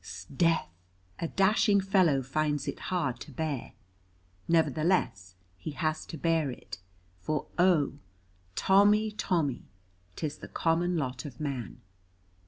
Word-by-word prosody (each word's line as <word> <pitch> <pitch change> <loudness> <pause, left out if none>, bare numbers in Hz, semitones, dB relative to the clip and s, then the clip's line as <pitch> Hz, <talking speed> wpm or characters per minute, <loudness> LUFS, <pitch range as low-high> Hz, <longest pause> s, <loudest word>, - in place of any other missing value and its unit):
S'death, 130 - 0 0.5
a 165 - -1
dashing 200 +2 +3
fellow 185 -8 +3
finds 145 +2 -1
it - - -4
hard 155 -9 -1
to 150 - -9
bear. 145 -1 -3 0.7
Nevertheless, 155 - +1 0.2
he 155 - -5
has 155 +1 -2
to 165 - -7
bear 165 -2 +1
it, 125 - -8 0.4
for 150 +11 -2
oh, 160 -6 +3 0.6
Tommy, 205 +2 +4
Tommy, 165 - -1 0.5
'tis 150 -1 -4
the - - -8
common 170 +2 +1
lot 130 -4 -3
of 135 -5 -9
man. 130 - -4
155 Hz, 120 wpm, -29 LUFS, 135-175 Hz, 0.7 s, Tommy